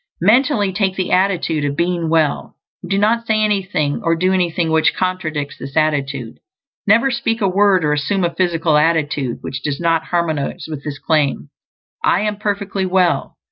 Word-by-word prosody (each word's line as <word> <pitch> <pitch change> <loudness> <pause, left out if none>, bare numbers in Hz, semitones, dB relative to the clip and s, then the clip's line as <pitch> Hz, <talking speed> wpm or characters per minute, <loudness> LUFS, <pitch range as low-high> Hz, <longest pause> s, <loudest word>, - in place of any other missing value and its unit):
Mentally 215 - +3
take 190 -1 0
the 185 -1 -2
attitude 180 -5 +1
of 145 -1 -1
being 170 -1 0
well, 160 -3 0 0.3
and 180 - -9
do 195 - +1
not 230 +3 +1
say 215 -1 +2
anything 190 -8 -1
or 165 0 +2
do 185 +3 +1
anything 175 -2 0
which 160 0 +2
contradicts 160 -6 -3
this 135 +3 -7
attitude. 140 -6 -1 0.5
Never 230 +6 +4
speak 225 -1 -1
a 200 - +1
word 190 -2 +3
or 150 - +2
assume 185 +6 -1
a 170 - 0
physical 165 -4 +1
attitude 150 -5 0
which 130 -1 -5
does 140 0 -3
not 165 -1 +1
harmonize 160 -5 -2
with 150 -3 -7
the 145 -2 -5
claim: 145 - 0 0.5
"I 180 - +3
am 210 -1 -2
perfectly 200 -2 -2
well." 185 -1 +1
175 Hz, 175 wpm, -18 LUFS, 155-195 Hz, 0.5 s, Never